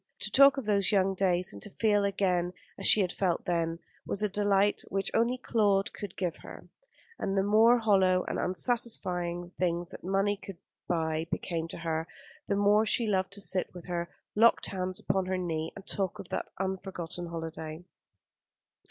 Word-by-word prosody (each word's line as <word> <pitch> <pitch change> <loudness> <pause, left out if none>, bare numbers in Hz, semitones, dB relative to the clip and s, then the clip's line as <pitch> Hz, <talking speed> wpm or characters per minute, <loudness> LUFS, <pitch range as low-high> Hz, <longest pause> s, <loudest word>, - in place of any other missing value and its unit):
To 215 - -2
talk 275 +3 +7
of 270 - -3
those 200 -2 +2
young 195 -1 +3
days, 185 -1 +1
and - - -10
to 210 - -7
feel 205 0 +2
again 185 -3 0 0.2
as 195 - +1
she 215 - +7
had 180 -2 -1
felt 180 -4 -1
then, 165 -1 0 0.3
was 205 - -1
a 210 - +2
delight 205 0 +2
which 195 0 -1
only 235 +3 +2
Claude 205 -6 +1
could 200 -3 -8
give 180 -4 -2
her; - - -12 0.5
and 195 0 -1
the 195 - +3
more 220 +4 +5
hollow 190 -5 +3
and - - -2
unsatisfying 180 -4 -1
the 175 - -12
things 175 -1 -1
that - - -10
money 195 +2 +1
could 195 -2 -10 0.3
buy 160 -1 -1
became 165 -2 -3
to - - -7
her, 165 -1 -2 0.4
the 200 - +1
more 205 +1 +4
she 225 +2 +2
loved 190 -3 0
to 200 - -4
sit 185 -1 -1
with 175 - -9
her 175 -1 -3 0.2
locked 230 +2 +4
hands 185 -1 -3
upon 190 -1 -1
her 185 0 0
knee 165 -3 -2
and 195 - -10
talk 190 -3 -2
of - - -9
that - - -3
unforgotten 185 -2 -4
holiday. 160 -1 -6
190 Hz, 185 wpm, -29 LUFS, 175-205 Hz, 0.5 s, talk